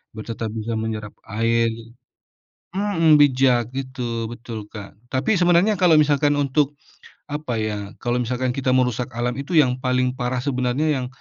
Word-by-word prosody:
biar 110 - -7
tetap 115 0 -4
bisa 115 +1 -3
menyerap 110 -2 -4 0.2
air, 115 +2 +1 1.1
mhm, 190 -6 +3
bijak 130 -4 +3
gitu 130 -1 -5 0.3
betul 120 -1 -7
Kak 100 -2 -8 0.2
tapi 180 +11 +1
sebenarnya 175 +4 +4
kalau 175 -3 +5
misalkan 145 0 +2
untuk, 140 +1 +1 0.6
apa 145 -5 -3
ya 110 -1 -2 0.3
kalau 120 0 0
misalkan 125 +1 -1
kita 130 0 -3
merusak 125 -1 0
alam 120 +1 0
itu 160 +6 -5
yang 130 -4 +4
paling 125 0 +1
parah 125 -1 -2
sebenarnya 130 +2 0
yang, 125 - -4
125 Hz, 150 wpm, -22 LUFS, 120-145 Hz, 1.1 s, kalau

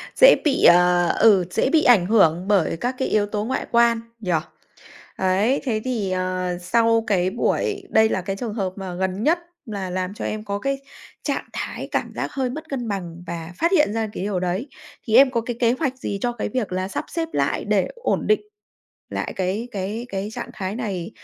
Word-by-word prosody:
Dễ - - +8
bị, 290 - +2
ờ, 175 0 +6
ừ, 200 -5 +6
dễ 255 - +1
bị 315 +1 +4
ảnh 220 -8 +6
hưởng 180 -4 +3
bởi 195 -6 +2
các 245 +9 -2
cái 260 - -1
yếu 210 -1 +2
tố 210 0 -3
ngoại 260 - -2
quan, 235 -1 +4 0.2
nhỉ? 190 -5 -3 0.9
Đấy, 195 +8 +2
thế 225 -6 -1
thì, 225 -7 -1
ờ, 185 -1 -1
sau 230 +4 +2
cái 185 -3 +2
buổi 395 - -1
đây 220 0 +4
là 190 - -1
cái 195 +2 -3
trường 220 +1 -4
hợp 195 -4 -2
mà 190 -3 -6
gần 190 +2 -2
nhất 330 +5 +3 0.3
là 200 -5 -4
làm 185 +1 -3
cho - - -6
em 215 0 -3
có 200 -1 -3
cái 275 +4 -1 0.5
trạng - - -1
thái - - -5
cảm - - -1
giác - - -3
hơi 265 -2 -1
mất 310 +5 -7
cân 250 -4 -3
bằng 175 -4 -5
và 170 0 -6
phát 335 - +1
hiện 300 - +3
ra 225 -1 -1
cái - - -4
điều 200 -2 -1
đấy. 185 +8 -2 0.4
Thì 220 - +2
em 265 +1 +7
có 235 -3 0
cái 235 +1 -4
kế 235 -2 +4
hoạch 260 -1 -1
gì 200 -5 -3
cho 245 - 0
cái 240 -3 -4
việc 220 -2 -2
là 185 +1 -1
sắp 195 - -4
xếp 330 -1 -3
lại - - 0
để - - +2
ổn 475 +1 -1
định 425 - +3 0.7
lại - - -3
cái 195 +6 -2
cái 210 +3 -4
cái 195 -1 -3
trạng - - -6
thái 195 0 -4
này 205 -6 -4
210 Hz, 215 wpm, -22 LUFS, 185-245 Hz, 0.9 s, Dễ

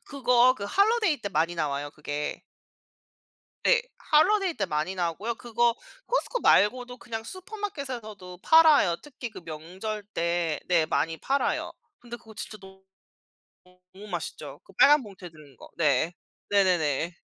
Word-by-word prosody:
그거 250 -2 +3
그 200 - -7
holiday 400 - +2
때 200 - -3
많이 165 0 0
나와요 145 -2 -2
그게. 150 -1 -5 1.2
네. - - +4 0.3
holiday 375 +3 +4
때 195 - -1
많이 155 +3 -2
나오고요. 185 +6 -2
그거 235 0 +1 0.3
Costco말고도 250 - +2
그냥 225 -2 -6
슈퍼마켓에서도 265 - -7
팔아요. 310 - +6
특히 255 -4 -8
그 - - -10
명절 185 +7 -6
때 170 -2 0
네 170 -3 +2
많이 165 +1 0
팔아요. 275 +1 -1 0.3
근데 240 0 -9
그거 220 -2 -16
진짜 215 - -7
너무 190 0 -15 1.1
너무 205 +2 -11
맛있죠. 175 -4 -6
그 - - -19
빨간 295 -1 +6
봉투에 195 -4 -11
든 150 -4 -17
거. - - -14
네. 155 +1 +2 0.4
네네네. 175 -5 +1
205 Hz, 325 characters per minute, -27 LUFS, 170-255 Hz, 1.2 s, 팔아요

